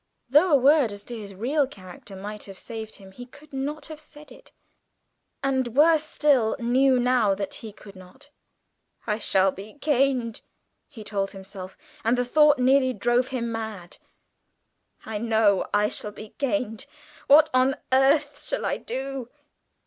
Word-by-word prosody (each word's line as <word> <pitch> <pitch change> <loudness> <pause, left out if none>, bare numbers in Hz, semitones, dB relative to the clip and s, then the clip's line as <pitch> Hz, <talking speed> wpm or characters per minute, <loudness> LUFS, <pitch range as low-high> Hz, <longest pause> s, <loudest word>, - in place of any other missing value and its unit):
Though 305 +7 +5
a - - +9
word 275 -2 +4
as 205 0 -9
to 240 - -8
his 205 -3 -9
real 270 +8 0
character 195 -4 -12
might 205 +2 -7
have 195 -1 -11
saved 220 -1 -7
him, 195 -1 -14
he 245 +5 -11
could 290 +3 -18
not 285 +3 -4
have 310 -1 -10
said 300 -1 -14
it, - - -16 0.9
and, 260 -3 -1
worse 315 +1 +5
still, 285 -7 +2
knew 255 +2 +3
now 245 -5 +2
that 200 0 -5
he 220 - -8
could 200 -1 -15
not. 190 +11 -15 0.7
"I 215 -1 -1
shall 190 -2 +2
be 200 +6 -11
caned," 270 -5 0 0.5
he 225 -6 -11
told 200 -1 -3
himself, 190 -1 -10 0.3
and 235 +2 +2
the 245 - 0
thought 300 +3 +4
nearly 260 0 +3
drove 240 +4 +1
him 235 -3 -3
mad. 220 -6 -6 1.1
"I 220 -1 -4
know 220 -3 +2
I 205 0 +2
shall 210 - -4
be 215 +1 -11
caned! 270 -3 -2 0.4
What 310 +2 +6
on 255 +1 +3 0.2
earth 270 +3 +3
shall - - -3
I - - -1
do?" 265 -2 -5
245 Hz, 160 wpm, -25 LUFS, 210-275 Hz, 1.1 s, a